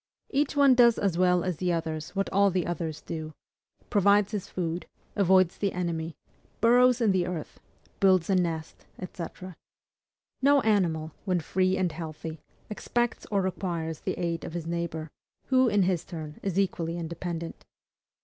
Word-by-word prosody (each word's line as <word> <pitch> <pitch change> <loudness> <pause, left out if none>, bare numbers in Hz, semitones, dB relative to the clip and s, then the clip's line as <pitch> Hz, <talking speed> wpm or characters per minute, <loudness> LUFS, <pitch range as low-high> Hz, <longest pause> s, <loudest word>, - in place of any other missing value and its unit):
Each 285 +2 +1
one 280 -2 +6
does 240 -2 +5
as 195 -4 0
well 180 0 +3
as 180 -4 -2
all - - -25
the 180 -1 +1
others 160 0 -4
what 195 0 0
all 200 +1 +4
the 185 -2 0
others 160 -2 -3
do; 155 -1 -6 0.6
provides 205 0 +4
his 205 -4 -3
food, 170 -1 -3 0.3
avoids 185 -2 +3
the 200 -2 0
enemy, 165 -2 -3 0.4
burrows 245 +1 +5
in 220 -3 +4
the 180 -2 +1
earth, 175 -4 -6 0.4
builds 185 -3 +4
a 195 - +2
nest, 165 -4 -2 0.3
&c. 175 - -5 1.2
No 280 +1 +5
animal, 170 -8 +1
when 185 -3 +1
free 185 +3 +1
and 185 -2 0
healthy, 160 -1 -7 0.3
expects 240 +2 -2
or 200 -2 +1
requires 170 -4 -3
the - - -3
aid 170 -2 -2
of - - -6
his 170 -2 -4
neighbor; 165 -2 -3 0.4
who, 260 -1 +4
in 205 -3 +3
his 180 -3 0
turn, 155 -4 -8
is 195 -2 -2
equally 170 -4 0
independent. 170 0 -5
180 Hz, 160 wpm, -28 LUFS, 165-200 Hz, 1.2 s, one